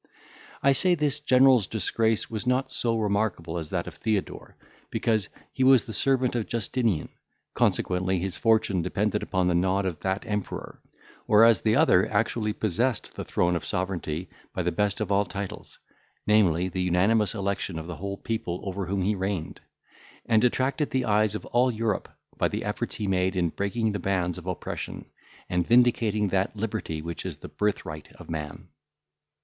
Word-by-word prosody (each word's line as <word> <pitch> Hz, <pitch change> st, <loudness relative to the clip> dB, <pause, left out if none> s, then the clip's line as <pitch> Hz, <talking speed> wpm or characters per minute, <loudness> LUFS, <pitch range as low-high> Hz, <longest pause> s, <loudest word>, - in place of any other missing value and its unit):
I 140 Hz, -, +6 dB
say, 180 Hz, +6 st, +4 dB
this 150 Hz, -2 st, 0 dB
general's 130 Hz, -6 st, +5 dB
disgrace 110 Hz, 0 st, 0 dB
was 110 Hz, +2 st, -4 dB
not 130 Hz, +2 st, +1 dB
so 115 Hz, -1 st, 0 dB
remarkable 100 Hz, -6 st, -1 dB
as 80 Hz, -2 st, -6 dB
that 85 Hz, -2 st, -2 dB
of -, -, -9 dB
Theodore, 110 Hz, -3 st, -3 dB, 0.3 s
because 110 Hz, -4 st, 0 dB, 0.2 s
he 130 Hz, -, 0 dB
was 130 Hz, -2 st, +6 dB
the 110 Hz, -, -6 dB
servant 130 Hz, -1 st, +2 dB
of 120 Hz, -3 st, -2 dB
Justinian, 115 Hz, -6 st, 0 dB, 0.4 s
consequently 95 Hz, +1 st, +1 dB
his 95 Hz, +1 st, -3 dB
fortune 110 Hz, -5 st, +2 dB
depended -, -, -1 dB
upon 95 Hz, -1 st, 0 dB
the 90 Hz, -, +2 dB
nod 95 Hz, +3 st, +1 dB
of 85 Hz, -5 st, -3 dB
that 95 Hz, +1 st, -2 dB
emperor; 105 Hz, -1 st, -4 dB, 0.5 s
whereas 115 Hz, +1 st, +6 dB
the 110 Hz, -1 st, +2 dB
other -, -, +4 dB
actually 110 Hz, -2 st, 0 dB
possessed 110 Hz, +4 st, -1 dB
the -, -, -5 dB
throne 90 Hz, 0 st, +1 dB
of 85 Hz, -, -3 dB
sovereignty 90 Hz, -3 st, -3 dB, 0.3 s
by -, -, -1 dB
the -, -, 0 dB
best 105 Hz, +2 st, 0 dB
of -, -, -2 dB
all 100 Hz, +1 st, +4 dB
titles, 100 Hz, -1 st, -7 dB, 0.5 s
namely, 95 Hz, -5 st, +3 dB
the 95 Hz, 0 st, -3 dB
unanimous 100 Hz, +5 st, +2 dB
election 100 Hz, -3 st, -2 dB
of 80 Hz, -, -5 dB
the 85 Hz, -2 st, -7 dB, 0.3 s
people 90 Hz, -6 st, -3 dB
over 95 Hz, -1 st, -4 dB
whom 95 Hz, 0 st, -1 dB
he 105 Hz, +3 st, +2 dB
reigned; 95 Hz, -4 st, -3 dB, 0.6 s
and 110 Hz, -2 st, +3 dB
attracted 130 Hz, +4 st, +1 dB
the 130 Hz, -1 st, 0 dB
eyes 105 Hz, 0 st, +2 dB
of 105 Hz, -, -5 dB
all 125 Hz, +2 st, +2 dB
Europe, 110 Hz, -3 st, -1 dB, 0.3 s
by -, -, +3 dB
the -, -, -4 dB
efforts -, -, -3 dB
he 105 Hz, -, -3 dB
made 95 Hz, -1 st, +1 dB
in 85 Hz, -2 st, +1 dB
breaking 110 Hz, +5 st, -1 dB
the 100 Hz, -, -3 dB
bands 90 Hz, -2 st, -1 dB
of 90 Hz, -, -13 dB
oppression, 90 Hz, -, -5 dB, 0.4 s
and 90 Hz, -1 st, 0 dB
vindicating 115 Hz, -4 st, +3 dB
that 95 Hz, +3 st, 0 dB
liberty 105 Hz, -7 st, -3 dB
which 85 Hz, 0 st, -5 dB
is 90 Hz, -6 st, -5 dB
the -, -, -9 dB
birthright 80 Hz, -2 st, -3 dB
of -, -, -11 dB
man. 75 Hz, -3 st, -6 dB
100 Hz, 170 wpm, -26 LUFS, 90-115 Hz, 0.6 s, I